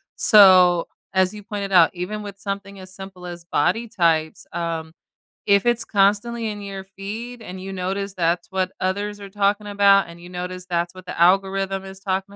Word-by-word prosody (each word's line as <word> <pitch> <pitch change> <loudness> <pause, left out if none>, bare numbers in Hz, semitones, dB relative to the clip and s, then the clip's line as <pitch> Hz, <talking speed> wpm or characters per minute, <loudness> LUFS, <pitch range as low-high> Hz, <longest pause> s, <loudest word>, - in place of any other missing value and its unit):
So, 185 -5 +6 0.3
as 190 0 +3
you 210 -1 -10
pointed 200 -2 -5
out, 175 -3 +6
even 195 +4 -5
with 200 -1 -9
something 200 -1 -6
as 185 0 -11
simple 190 -2 -10
as 175 -1 -9
body 180 +9 0
types, 165 -7 0
um, 165 -1 -4 0.5
if 200 +2 +3
it's 240 0 +1
constantly 210 +3 +1
in 205 -1 -5
your 195 -1 -7
feed 215 +5 -8
and 185 -1 -8
you 195 +1 -6
notice 195 +1 -3
that's 170 0 0
what 185 -1 -1
others 205 +2 -2
are 200 -1 -9
talking 205 +1 0
about 200 -1 +4
and 170 0 -12
you 175 +1 -12
notice 180 0 -6
that's 175 0 -1
what 185 0 -12
the - - -7
algorithm 195 +1 +2
is 190 0 -10
talking 195 +1 -3
195 Hz, 185 wpm, -22 LUFS, 180-200 Hz, 0.5 s, So